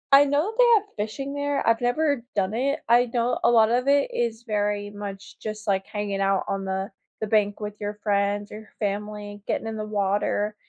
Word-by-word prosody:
I 280 +1 +9
know 295 +9 +1
they - - +7
have 410 - +3
fishing 245 +7 -3
there. 285 -1 -1
I've 230 0 +3
never 275 +1 +1
done 195 0 +1
it. 275 +6 0
I 240 +1 +6
know 240 0 +1
a - - +5
lot 225 -2 +5
of 250 +2 +1
it 280 0 +3
is 235 -1 -1
very 205 -2 -1
much 200 -1 -8
just 215 0 -6
like 195 -1 +1
hanging 205 -2 -3
out 195 -1 +2
on 195 0 -2
the 190 +1 -3 0.3
the 215 - -1
bank 205 -1 +2
with 210 -1 -6
your 205 0 -3
friends 205 0 0
or 215 0 -10
family, 205 0 -4
getting - - -1
in 220 0 -4
the 215 - -3
water. 205 0 0
215 Hz, 200 wpm, -25 LUFS, 205-240 Hz, 0.3 s, I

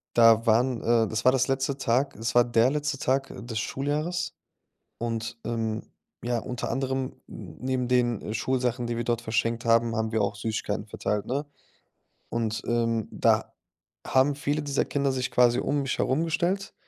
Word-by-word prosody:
Da 115 -1 +6
waren 120 +2 +3
äh, 115 -1 +3
das 110 +1 -2
war 130 - +8
das 130 -1 +2
letzte 135 0 0
Tag. 135 +2 +1
Es 110 +1 -3
war 120 - +7
der 120 +1 +3
letzte 150 -1 -1
Tag, 135 +1 0
äh, - - -9
des 115 -2 -3
Schuljahres. 150 +9 -2 0.6
Und, 115 -1 -3
ähm, 115 -2 -2 0.4
ja, 120 0 0
unter 125 +2 -4
anderem 135 -1 -1 0.2
n - - -10
neben 130 -1 -1
den, 120 -3 +2
äh, 105 - -5
Schulsachen, 125 +1 -1
die 120 0 -2
wir 120 - -1
dort 120 0 0
verschenkt 115 +1 -1
haben, 115 0 +3
haben 110 -1 -1
wir 110 -1 +1
auch 100 0 0
Süßigkeiten 105 0 -3
verteilt, 105 0 -2
ne? 140 +4 -2 0.8
Und, 110 -2 -2
ähm, 115 -2 0
da - - +2 0.5
haben 135 +2 +3
viele 145 +1 -1
dieser 140 -1 0
Kinder 140 -1 0
sich 125 -1 -2
quasi 125 0 +4
um 145 0 0
mich 135 - -2
herum 140 +5 +1
gestellt, 175 +5 -1
120 Hz, 180 wpm, -27 LUFS, 115-135 Hz, 0.8 s, war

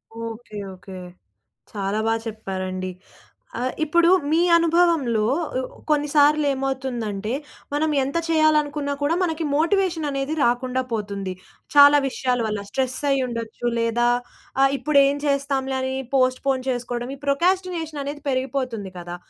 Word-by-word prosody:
Okay. 230 -1 -7 0.2
Okay. 185 0 -11 0.8
చాలా 200 +1 -2
బా 225 - +2
చెప్పారండి. 185 -4 -4 0.7
ఆహ్, 255 +1 -1
ఇప్పుడు 340 +3 +3 0.2
మీ 330 - +4 0.2
అనుభవంలో 330 -9 +3 0.4
ఉ - - -2 0.3
కొన్ని 295 -1 +2
సార్లు 295 +1 +5
ఏమవుతుందంటే, 245 -6 -3 0.4
మనం 310 +1 +1
ఎంత 275 +5 -3
చేయాలనుకున్నా 300 -2 +2
కూడా 305 +4 +2
మనకి 325 -2 -1
మోటివేషన్ 335 0 +1
అనేది 275 +2 -2
రాకుండా 255 +1 +1
పోతుంది. 200 -3 -3 0.4
చాలా 285 0 +8
విషయాల 250 -1 -1
వల్ల 210 -1 -3
స్ట్రెస్ 260 -1 -1
అయ్యి 270 -1 +2
ఉండొచ్చు, 230 0 -5
లేదా 230 +1 +2 0.5
ఆ! - - +6 0.2
ఇప్పుడు 295 -1 +3
ఏం 280 +1 +1
చేస్తాంలే? 275 -1 0
అని 260 0 -2 0.2
పొస్ట్‌ఫోన్ 260 0 +1
చేసుకోవడం 245 0 -3
ఈ - - -20
ప్రోకాస్టినేషన్ 335 -1 0
అనేది 290 0 -6
పెరిగిపోతుంది 255 -6 -2
కదా! 175 0 -6
265 Hz, 130 wpm, -23 LUFS, 230-295 Hz, 0.8 s, చాలా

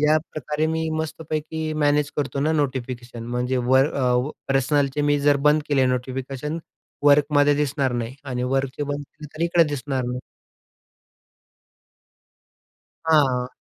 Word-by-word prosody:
याप्रकारे 155 0 0
मी 160 0 -1
मस्तपैकी 155 0 -3
मॅनेज 145 0 +2
करतो 140 -1 -2
ना 155 +3 +2
नोटिफिकेशन 125 -5 -3
म्हणजे 125 +2 -1
वर 130 +2 +5 0.6
पर्सनलचे 135 +1 +1
मी 145 0 +2
जर 145 0 +4
बंद 150 +1 +3
केले 135 -3 +3
नोटिफिकेशन 130 +4 -3 0.5
वर्कमध्ये 145 0 +5
दिसणार 140 -2 0
नाही 120 0 -3
आणि 125 -3 -3
वर्कचे 135 +2 -1
बंद 145 0 -3
केले 150 +2 -13
तर 160 - -2
इकडं 170 -1 +4
दिसणार 135 -2 -2
नाही. 125 +1 -3 2.9
हां. 135 -6 +3
145 Hz, 120 wpm, -23 LUFS, 130-150 Hz, 2.9 s, वर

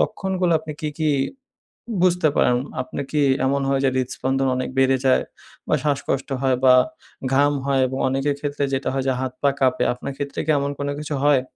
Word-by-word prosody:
লক্ষণগুলো 185 -3 0
আপনি 155 -1 -7
কি, 155 - -2
কি 155 -1 +1 0.9
বুঝতে 180 -3 +3
পারেন? 120 - +4 0.2
আপনে 130 +2 -5
কি 150 -1 +1 0.2
এমন 140 +1 +1
হয় 135 -1 +2
যে 135 - +4
হৃৎস্পন্দন 130 +1 -1
অনেক 130 - -2
বেড়ে 135 0 +4
যায় 130 - +4 0.4
বা - - +3
শ্বাসকষ্ট 140 -1 -1
হয় 130 -2 +2
বা 130 - +8 0.6
ঘাম 145 +2 +4
হয় 135 -1 +2
এবং 130 +1 -4
অনেকের 135 +2 0
ক্ষেত্রে 145 -1 -2
যেটা 135 -1 -1
হয় 135 -1 -1
যে 130 - +2
হাত, 130 -1 -2
পা 140 - +4
কাঁপে 130 -2 +2
আপনার 135 +3 -6
ক্ষেত্রে 140 -1 -4
কি 155 - +2
এমন 140 0 -1
কোন 140 - -2
কিছু 150 -1 -4
হয়? 145 -3 +4
140 Hz, 190 wpm, -22 LUFS, 130-145 Hz, 0.9 s, বা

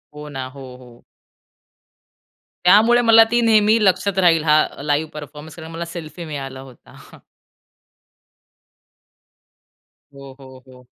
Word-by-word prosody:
हो 150 0 -10
ना, 135 -2 -6
हो, 130 -1 -12
हो. 120 -2 -18 1.6
त्यामुळे 220 +6 +5
मला 225 -1 +6
ती 240 - +2
नेहमी 220 -1 +3
लक्षात 190 0 0
राहील 165 -4 +3
हा 155 -1 +3 0.2
लाईव्ह 150 +1 -1
परफॉर्मन्स, 150 +1 -11
कारण 160 -1 -11
मला 165 +1 -6
सेल्फी 170 0 -9
मिळाला 135 -4 -8
होता. 130 -2 -17 2.9
हो, 140 -1 -13
हो, 130 -1 -15
हो. 125 -1 -18
155 Hz, 115 wpm, -19 LUFS, 135-185 Hz, 2.9 s, मला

